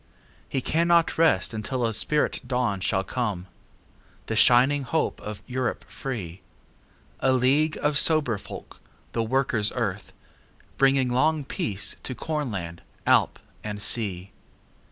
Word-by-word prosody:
He 135 - -1
cannot 170 +3 +2
rest 150 - +3
until 120 +3 -2
a 115 - -1
spirit 150 +7 0
dawnShall 100 -6 0
come;—the 105 0 -7
shining 130 +5 +5
hope 145 +5 -1
of 105 -1 -7
Europe 130 0 -3
free:A 95 +2 -6
league 135 +5 +2
of 145 0 +3
sober 150 -11 +3
folk, - - -10 0.3
the 115 - -1
Workers' 115 -3 +1
Earth, 105 -5 -3 0.7
Bringing 135 -2 +3
long 150 +3 +2
peace 105 -5 -3
to 130 - -5
Cornland, 105 - -4 0.2
Alp - - +3 0.3
and 105 -1 -5
Sea. 100 -4 -1
125 Hz, 115 wpm, -25 LUFS, 105-140 Hz, 0.7 s, shining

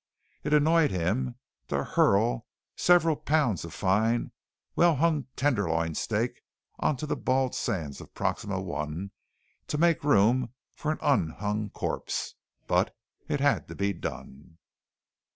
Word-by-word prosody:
It 150 - -2
annoyed 155 +1 +4
him 110 +8 -1 0.3
to - - -1
hurl - - +2 0.3
several 170 -3 +4
pounds 145 - +1
of 85 - -7
fine, 110 +6 +1 0.4
well 170 -2 +5
hung 155 0 +1
tenderloin 85 - +1
steak - - -2 0.4
onto 150 0 0
the 150 - -1
bald 130 0 +1
sands 75 -6 -3
of - - -14
Proxima - - -1
I 75 +6 -4 0.6
to 150 - -2
make 170 -1 +3
room 125 -2 +3 0.2
for 155 - -2
an 155 - -2
un 135 - +2
hung 105 +5 -3
corpse. - - -3 0.3
But - - +1 0.3
it 145 - -1
had 145 0 +2
to - - -8
be 100 0 0
done. 80 -2 -8
125 Hz, 135 wpm, -28 LUFS, 95-150 Hz, 0.6 s, well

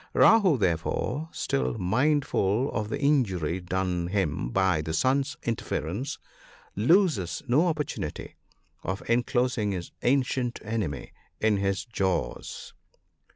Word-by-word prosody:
Rahoo, 200 -10 +6
therefore, 110 - -1
still 65 -2 -1
mindful 125 +1 +1
of 105 0 -2
the - - -2
injury 95 - +1
done 90 -1 -1
him 90 -10 -1
by 95 0 +2
the 80 +1 -4
sun's 135 - +1
interference, 115 - -3 0.6
loses 135 - +2
no 145 +9 +4
opportunity 150 -4 -3 0.5
of 95 +3 -4
enclosing 120 -2 +1
his 90 -2 -5
ancient 125 -2 +1
enemy 105 -10 -3 0.3
in 110 -2 +3
his 95 -1 -1
jaws. 95 -6 -3
110 Hz, 110 wpm, -27 LUFS, 90-130 Hz, 0.6 s, Rahoo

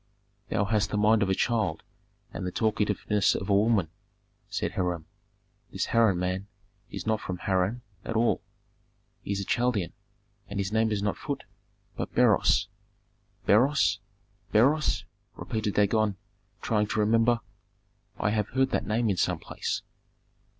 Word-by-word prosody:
"Thou 105 - +1
hast 105 0 +1
the 105 - -1
mind 105 +1 +4
of 100 - +2
a 95 - +2
child 110 -9 0 0.5
and - - -5
the 90 - -2
talkativeness 105 -1 +1
of 95 - -4
a - - +5
woman," 100 -5 +3 0.6
said 100 - -2
Hiram. 90 -5 -2 0.7
"This - - -2
Harran 115 -5 +4
man 95 +2 -2 0.4
is 100 - -6
not 110 0 0
from 90 - -4
Harran 95 +6 0 0.2
at 115 - -4
all. 115 +1 +2 0.8
He - - -5
is 100 - -1
a 100 - -3
Chaldean, 120 -7 0 0.5
and 100 0 -4
his 100 0 -1
name 110 0 +2
is 100 -1 -1
not 105 - 0
Phut, - - -4 0.5
but - - -5
Beroes - - +4 0.4
" - - -40
"Beroes? 115 -3 +4 0.5
Beroes?" 140 +8 +3 0.3
repeated 110 -2 -3
Dagon, 105 -1 +2 0.5
trying 105 -2 +1
to 110 - -2
remember. 115 +2 +3 0.8
"I 105 - 0
have 105 -2 0
heard 130 +1 +1
that - - -1
name 115 +2 +1
in 100 -3 +1
some - - +1
place." - - -4
105 Hz, 150 wpm, -28 LUFS, 100-115 Hz, 0.8 s, a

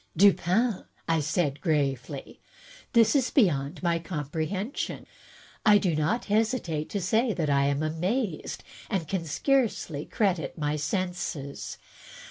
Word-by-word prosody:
"Dupin,'* 200 +3 +3 0.4
said 150 -1 0
I - - -27
gravely, 140 -3 -2 0.5
"this 230 +1 +5
is 265 -3 +3
beyond 170 - +2
my 170 -1 +2
comprehension. 165 - -3 0.6
I 210 -2 +7
do 180 -6 +1
not 155 +11 0
hesitate 210 -8 0
to 200 - -2
say 220 +6 +2
that 155 -6 0
I 140 0 +3
am 140 +2 +1
amazed, 175 - -2 0.3
and 190 -7 -1
can 180 0 -2
scarcely 180 - 0
credit 190 -7 0
my 150 -1 0
senses. 155 -3 -3
175 Hz, 120 wpm, -27 LUFS, 150-210 Hz, 0.6 s, I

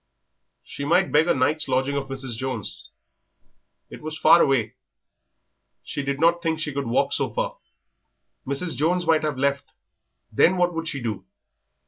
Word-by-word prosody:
She 140 - -8
might 175 +6 +2
beg 155 +3 +4
a - - +4
night's 145 +4 +1
lodging 135 +2 0
of 140 -1 -2
Mrs. 135 -3 -5
Jones. 125 -3 -6 1.0
It - - -10
was 155 0 -6
far 160 +2 +6
away; 125 -6 +1 1.1
she - - -4
did 140 0 -3
not 170 +2 +3
think 160 -2 -1
she 150 -3 -3
could 140 -1 -3
walk 115 - +1
so - - -1
far. - - -3 0.9
Mrs. 140 +4 -1
Jones 170 +6 +1
might 160 -1 +3
have 150 -3 -2
left, 140 0 0 0.7
then 185 +2 +3
what 175 0 +2
would 165 0 -4
she 140 -5 -3
do? 110 -4 -4
145 Hz, 160 wpm, -24 LUFS, 135-165 Hz, 1.1 s, far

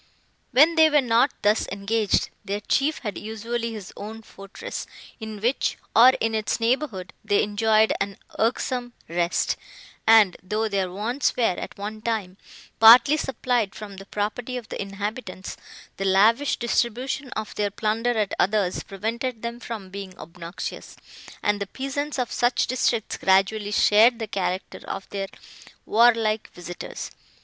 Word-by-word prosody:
When 305 +6 +6
they 320 -1 +6
were 300 -1 +4
not 245 +1 +3
thus 210 +1 +2
engaged, 200 +1 0
their 205 +1 -3
chief 280 +8 +1
had 210 - -3
usually 230 +2 -4
his 210 -4 -8
own 220 +2 -8
fortress, 195 -1 -8 0.3
in 220 -2 -7
which, 245 +5 0 0.2
or 240 +3 +9
in 225 0 0
its 220 +1 -1
neighbourhood, 230 -5 -1
they 205 -1 +2
enjoyed 215 +1 +3
an 200 0 -2 0.2
irksome 245 +1 -1
rest; 170 +1 0 0.5
and, 220 -4 +6
though 215 +4 -1
their 195 -3 -1
wants 230 +8 -1
were, 245 - +1
at 185 -5 -1
one 210 +2 -6
time, 215 -5 -3 0.4
partly 235 +6 +9
supplied 245 -7 -1
from 205 -2 -9
the 195 +1 -11
property 220 +5 -3
of 235 -3 -8
the - - -4
inhabitants, 200 -1 -5 0.4
the 195 - -2
lavish 220 +9 +4
distribution 250 +3 -1
of 215 -1 -5
their 205 -1 0
plunder 225 +3 -1
at 210 -2 0
others, 195 -2 +1
prevented 225 +4 -4
them 235 +1 -4
from 220 -5 -7
being 195 -1 -8
obnoxious; 170 +1 -7 0.5
and 210 0 +1
the 200 - -2
peasants 275 +6 -4
of 250 -2 -2
such 240 +1 +2
districts 240 -3 0
gradually 195 +2 +2
shared 220 +3 +5
the 225 - -3
character 190 -2 -3
of 195 - -5
their 195 -1 -3 0.6
warlike 225 -1 +3
visitors. 175 0 -7
220 Hz, 145 wpm, -24 LUFS, 200-240 Hz, 0.6 s, or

